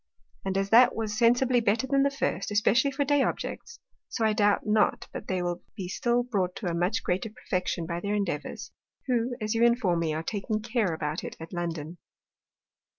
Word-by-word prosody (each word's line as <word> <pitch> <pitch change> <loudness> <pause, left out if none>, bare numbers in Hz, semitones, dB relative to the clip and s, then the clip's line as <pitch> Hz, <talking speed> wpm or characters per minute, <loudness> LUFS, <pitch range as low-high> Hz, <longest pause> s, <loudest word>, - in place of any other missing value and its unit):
And 195 0 -1
as 195 0 -1
that 245 +2 +7
was 220 -2 -2
sensibly 245 +2 +4
better 225 +3 +1
than 275 +1 +2
the 280 - +3
first 235 -9 -2
(especially 220 +6 +3
for 280 +1 -1
Day 290 0 +3
Objects,) 470 - -3 0.3
so 225 - -1
I 215 - +3
doubt 205 -1 +2
not 215 0 +2
but - - -7
they 185 -2 -1
will 175 0 -2
be 190 -3 -5
still 240 +6 +1
brought 195 -7 -1
to 215 - -6
a 175 - 0
much 180 +6 0
greater 185 +5 -1
perfection 185 -4 -3
by 170 +1 -3
their 200 +3 -2
Endeavours, 185 -8 -3 0.3
who, 245 -1 0
as 215 -1 -1
you 230 +1 +2
inform 235 -8 +3
me, 160 -2 -1
are 160 - -3
taking 215 +3 -2
care 220 -3 0
about 150 +1 -3
it - - -7
at 165 +3 -9
London. 170 -1 -4
210 Hz, 200 wpm, -28 LUFS, 180-240 Hz, 0.3 s, that